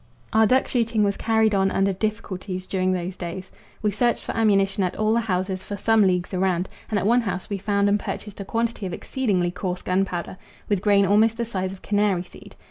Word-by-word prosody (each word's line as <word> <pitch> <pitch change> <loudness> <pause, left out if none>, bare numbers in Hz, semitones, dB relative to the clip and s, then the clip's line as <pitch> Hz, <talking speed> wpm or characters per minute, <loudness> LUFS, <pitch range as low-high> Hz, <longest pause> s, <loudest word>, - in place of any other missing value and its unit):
Our 220 0 +5
duck 260 +4 +3
shooting 230 -3 +1
was 200 -1 +1
carried 220 -1 +2
on 195 -1 +3
under 195 0 +1
difficulties 190 -2 -4
during 185 -1 0
those 180 0 -2
days. 180 +1 -6 0.3
We 210 - +2
searched 240 +3 +1
for - - -5
ammunition 200 -3 +2
at 180 - -1
all 215 0 +1
the 235 - +3
houses 185 -3 -2
for 205 - -6
some 220 0 +4
leagues 180 0 0
around, 185 -1 0 0.2
and 215 - 0
at 195 - 0
one 240 +3 +4
house 195 -3 -4
we 200 - -2
found 200 0 +1
and 205 +1 +3
purchased 205 0 -6
a - - -3
quantity 230 -1 -2
of 180 - -6
exceedingly 190 -7 -1
coarse 180 0 -4
gunpowder, 185 -1 -1 0.3
with 200 -3 0
grain 200 -1 +4
almost 215 +3 +3
the 235 - -1
size 190 -4 -3
of 190 - -11
canary 205 -3 +1
seed. 180 - -15
200 Hz, 210 wpm, -24 LUFS, 185-215 Hz, 0.3 s, Our